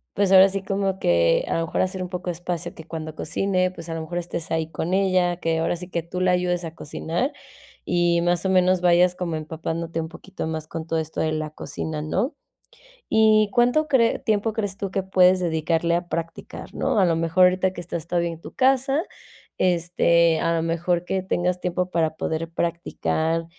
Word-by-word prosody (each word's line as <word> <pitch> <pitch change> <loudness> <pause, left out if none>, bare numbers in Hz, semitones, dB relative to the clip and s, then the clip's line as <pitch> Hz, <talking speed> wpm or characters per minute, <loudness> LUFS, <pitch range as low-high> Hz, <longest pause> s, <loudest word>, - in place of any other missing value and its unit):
pues, 200 -1 +2
ahora 190 +1 +8
sí, 195 0 -3
como 195 -1 -1
que 85 -1 +3
a - - 0
lo 165 - 0
mejor - - -1
hacer 185 0 -1
un 180 - -4
poco 180 0 -4
de - - -1
espacio 175 0 -4
que 160 - -12
cuando 160 -2 -6
cocine, 185 +3 0
pues, 170 -2 -10
a 165 - -3
lo 165 - -4
mejor 175 +2 -5
estés 170 -1 -4
ahí 160 0 -1
con 175 +3 -3
ella, 185 -3 +2
que 165 -1 -1
ahora 165 - 0
sí 175 +1 -8
que 170 - -2
tú 180 +2 -5
le 185 0 +3
ayudes 180 -1 0
a 160 - -7
cocinar 170 - -3 0.5
y 175 -1 +2
más 175 +1 0
o 190 - +2
menos 185 -1 +4
vayas 180 0 +4
como 175 -3 -3
empapándote 165 +1 -4
un 160 - -3
poquito 175 +2 -7
más 160 -1 -4
con 160 0 -6
todo 165 0 0
esto 160 0 -5
de 155 -1 0
la 155 -1 -2
cocina, 155 0 -5
¿no?, 195 - -1 0.7
¿y 215 -1 +4
cuánto 245 +8 +3
cree 235 -5 +3
tiempo 215 0 0
crees 205 -3 -3
tú 195 -1 -4
que 195 0 -1
puedes 185 -1 +4
dedicarle 165 0 0
a 175 0 -2
practicar?, 165 0 -6
¿no?, - - 0
a 190 - +5
lo 165 - +2
mejor 165 +3 +2
ahorita 185 +1 +2
que 175 - -6
estás 170 -2 -5
todavía 170 -1 0
en 165 - -10
tu - - -11
casa, 270 +3 +2 0.6
este, 170 -2 +3
a 165 0 +1
lo 165 - 0
mejor 170 +1 0
que 190 +1 -1
tengas 180 -1 -1
tiempo 180 0 -2
para 160 -2 0
poder 160 +1 -2
practicar, 165 -1 -1
175 Hz, 210 wpm, -23 LUFS, 165-185 Hz, 0.7 s, ahora